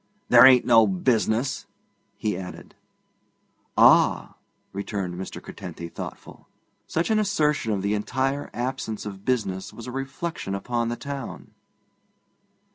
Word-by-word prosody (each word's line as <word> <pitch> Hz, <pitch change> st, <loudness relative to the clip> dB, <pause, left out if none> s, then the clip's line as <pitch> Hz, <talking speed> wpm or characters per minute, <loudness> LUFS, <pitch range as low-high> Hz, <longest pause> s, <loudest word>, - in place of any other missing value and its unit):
'There 125 Hz, +1 st, +9 dB
ain't 130 Hz, -2 st, +6 dB
no 115 Hz, -3 st, +6 dB
business!' 110 Hz, +5 st, 0 dB, 0.5 s
he 105 Hz, -3 st, -1 dB
added. 90 Hz, 0 st, -8 dB, 1.0 s
'Ah!' -, -, +5 dB, 0.4 s
returned 100 Hz, -2 st, -3 dB
Mr. 95 Hz, +2 st, -6 dB
Curtenty, 85 Hz, -2 st, -8 dB
thoughtful: -, -, -9 dB, 0.4 s
such 170 Hz, +7 st, -1 dB
an 215 Hz, -, +3 dB
assertion 150 Hz, -, +1 dB
of 100 Hz, -2 st, -1 dB
the 100 Hz, +1 st, +1 dB
entire 130 Hz, +6 st, -1 dB
absence 120 Hz, -3 st, -4 dB
of 100 Hz, -2 st, -8 dB
business 100 Hz, -7 st, -1 dB
was 115 Hz, -, -10 dB
a 125 Hz, -, -6 dB
reflection 135 Hz, -3 st, -4 dB
upon 115 Hz, +3 st, -2 dB
the 120 Hz, -, -2 dB
town. 140 Hz, -3 st, -7 dB
115 Hz, 120 wpm, -25 LUFS, 100-135 Hz, 1.0 s, There